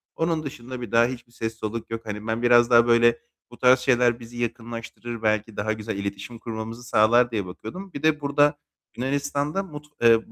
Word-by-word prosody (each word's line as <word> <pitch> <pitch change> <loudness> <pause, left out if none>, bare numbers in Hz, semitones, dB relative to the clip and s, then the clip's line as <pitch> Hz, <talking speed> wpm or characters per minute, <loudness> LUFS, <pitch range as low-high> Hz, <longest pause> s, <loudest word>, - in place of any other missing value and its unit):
onun 165 -1 0
dışında 130 -2 -7
bir 115 - -6
daha 115 0 +5
hiçbir 120 -1 -6
ses 115 -1 -4
soluk 110 +1 -5
yok. 115 0 -4
Hani, 105 +1 -6
ben 115 +1 -1
biraz 120 0 +5
daha 120 0 +6
böyle 120 0 +4 0.3
bu 120 - -13
tarz 125 +1 +5
şeyler 120 -2 +2
bizi 120 +1 -11
yakınlaştırır, 115 0 -5
belki 110 0 0
daha 110 +1 0
güzel 110 -1 -5
iletişim 100 +4 -5
kurmamızı 115 +1 -6
sağlar 120 +2 +4
diye 105 -4 -2
bakıyordum. 145 - -9
Bir 145 - -7
de 155 -1 +3
burada 145 +1 +2 0.4
Yunanistan'da 145 +6 -1
mut 150 -5 -10 0.2
eee, 115 -1 +4
120 Hz, 185 wpm, -24 LUFS, 115-130 Hz, 0.4 s, daha